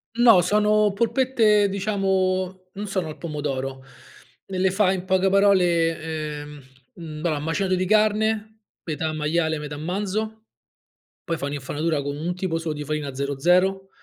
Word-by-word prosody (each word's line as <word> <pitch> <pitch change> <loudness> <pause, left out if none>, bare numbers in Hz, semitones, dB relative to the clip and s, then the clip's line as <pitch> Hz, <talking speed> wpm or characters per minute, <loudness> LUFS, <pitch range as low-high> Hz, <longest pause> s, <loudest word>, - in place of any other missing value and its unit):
No, 230 -6 +7
sono 210 +2 +3
polpette, 225 -2 +3
diciamo, 190 -2 -1
non 205 +1 -5
sono 190 -4 -2
al 155 - -8
pomodoro. 135 -4 -4 0.6
Le 190 -1 -5
le 190 +1 +3
fa 190 0 +2
in 185 -1 -3
poche 190 0 +2
parole 180 -4 +3 0.4
ehm, 145 -1 -11 0.3
mhmm, 160 -6 -8
bah, 155 -3 0
macinato 185 +5 -1
di 185 0 +1
carne 215 +1 +1 0.3
metà 155 0 -2
maiale 160 +1 0
metà 150 0 -6
manzo, 205 +6 -3 0.8
poi 165 - -2
fa 140 - -4
un'infarinatura 145 +2 -2
con 140 0 -4
un 170 +4 -3
tipo 180 -3 -2
solo 165 -1 -3
di 150 - -5
farina 150 -1 -3
00. 180 +8 +1
185 Hz, 145 wpm, -23 LUFS, 155-200 Hz, 0.8 s, No